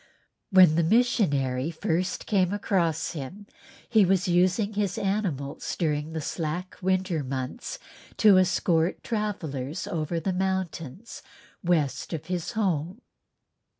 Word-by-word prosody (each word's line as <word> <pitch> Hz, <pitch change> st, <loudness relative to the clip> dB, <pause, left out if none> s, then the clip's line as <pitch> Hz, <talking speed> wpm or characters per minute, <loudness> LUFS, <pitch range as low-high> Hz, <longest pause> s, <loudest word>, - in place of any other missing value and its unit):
When 185 Hz, -6 st, +6 dB
the 170 Hz, -, +3 dB
missionary 160 Hz, -, +2 dB
first 180 Hz, +2 st, -2 dB
came 190 Hz, -4 st, +2 dB
across 185 Hz, -6 st, 0 dB
him 170 Hz, +7 st, -7 dB, 0.4 s
he 220 Hz, -3 st, +5 dB
was 185 Hz, -1 st, +2 dB
using 185 Hz, +4 st, +2 dB
his 200 Hz, -3 st, -1 dB
animals 185 Hz, -9 st, -2 dB
during 155 Hz, -2 st, -1 dB
the 160 Hz, -, -3 dB
slack 170 Hz, +4 st, -4 dB
winter 185 Hz, -4 st, 0 dB
months 130 Hz, -, -4 dB, 0.4 s
to 205 Hz, -4 st, +7 dB
escort 175 Hz, -2 st, +1 dB
travellers 160 Hz, -, -3 dB
over 165 Hz, 0 st, -2 dB
the 190 Hz, +3 st, -1 dB
mountains 190 Hz, -, -3 dB, 0.4 s
west 165 Hz, -3 st, 0 dB
of 160 Hz, -1 st, -4 dB
his 175 Hz, -2 st, -3 dB
home. 185 Hz, -, -1 dB
180 Hz, 115 wpm, -27 LUFS, 155-195 Hz, 0.4 s, to